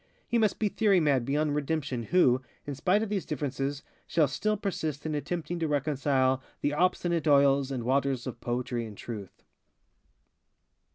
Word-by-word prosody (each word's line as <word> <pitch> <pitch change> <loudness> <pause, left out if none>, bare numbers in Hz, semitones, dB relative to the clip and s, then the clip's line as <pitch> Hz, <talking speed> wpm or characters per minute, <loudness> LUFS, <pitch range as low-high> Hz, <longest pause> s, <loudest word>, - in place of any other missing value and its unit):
He 235 - +1
must 215 -3 +2
be 215 - +1
theory 205 -2 +3
mad 140 -6 +2
beyond 145 +2 +1
redemption 145 -4 -1
who, 130 -2 +3 0.2
in 145 - -4
spite 185 +9 +2
of 220 - -4
these 205 -3 -1
differences, 140 -1 -3 0.2
shall 155 -3 +3
still 210 +10 -1
persist 160 -8 -3
in 155 - -2
attempting 170 +3 -3
to 165 - 0
reconcile 135 -2 +1 0.2
the 145 - 0
obstinate 170 0 +1
oils 140 -1 +4
and 130 -3 -3
waters 135 0 0
of 120 -2 -6
Poetry 120 -1 -2
and 105 -2 -11
Truth. 105 -5 -8
145 Hz, 160 wpm, -29 LUFS, 130-170 Hz, 0.2 s, oils